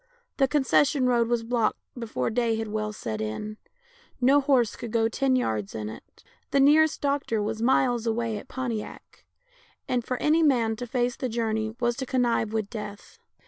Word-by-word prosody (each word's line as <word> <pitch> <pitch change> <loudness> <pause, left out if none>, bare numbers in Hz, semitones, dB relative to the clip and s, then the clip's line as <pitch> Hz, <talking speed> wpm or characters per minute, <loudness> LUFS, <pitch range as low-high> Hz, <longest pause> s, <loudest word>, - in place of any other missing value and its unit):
The 270 - +4
concession 280 0 +2
road 240 -2 +3
was 235 -1 0
blocked 230 -1 0 0.2
before 225 - -3
day 230 -1 +1
had 220 -1 -3
well 215 0 -2
set 110 - -5
in; 160 - -4 0.6
no 270 +3 +5
horse 265 -6 +2
could 235 - -7
go 225 0 +2
ten 260 +3 +1
yards 110 - -1
in 105 -1 -4
it. 110 - -13 0.3
The 280 - +2
nearest 305 +3 +4
doctor 280 -5 0
was 215 +1 -2
miles 245 -1 +2
away 225 -1 -1
at - - -13
Pontiac, 240 -5 -6 0.6
and 245 -1 0
for 255 +2 -3
any 310 +5 +3
man 240 -7 +3
to 245 +1 -5
face 245 0 0
the 255 - -3
journey 220 -1 -1
was 240 -1 +1
to 265 -2 -4
connive 240 -4 +1
with 220 -2 -1
death. 210 - -8
235 Hz, 180 wpm, -26 LUFS, 220-260 Hz, 0.6 s, no